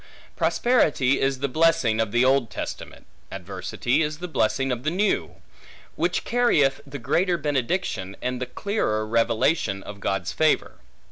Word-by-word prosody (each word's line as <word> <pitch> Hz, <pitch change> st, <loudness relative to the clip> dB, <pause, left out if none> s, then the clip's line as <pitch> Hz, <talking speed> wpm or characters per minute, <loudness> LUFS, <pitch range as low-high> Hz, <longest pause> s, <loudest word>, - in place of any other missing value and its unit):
Prosperity 145 Hz, -, +2 dB
is 135 Hz, -1 st, 0 dB
the 140 Hz, -, +1 dB
blessing 130 Hz, -7 st, +2 dB
of 110 Hz, -2 st, -2 dB
the 120 Hz, +3 st, +3 dB
Old 130 Hz, -3 st, +3 dB
Testament; -, -, -7 dB, 0.3 s
adversity 130 Hz, +6 st, -2 dB
is 150 Hz, -1 st, -1 dB
the 180 Hz, +2 st, -6 dB
blessing 135 Hz, -5 st, 0 dB
of 120 Hz, -1 st, -2 dB
the 150 Hz, -, 0 dB
New; 195 Hz, +5 st, 0 dB, 0.6 s
which -, -, 0 dB
carrieth 160 Hz, -, +2 dB
the 140 Hz, +1 st, -6 dB
greater 175 Hz, +8 st, +1 dB
benediction, 140 Hz, -, -2 dB
and 125 Hz, 0 st, -3 dB
the 125 Hz, -, -2 dB
clearer 110 Hz, -, -1 dB
revelation 115 Hz, -1 st, +1 dB
of 100 Hz, -1 st, -9 dB
God's 95 Hz, -2 st, -2 dB
favor. 155 Hz, -1 st, +1 dB
135 Hz, 145 wpm, -24 LUFS, 115-160 Hz, 0.6 s, the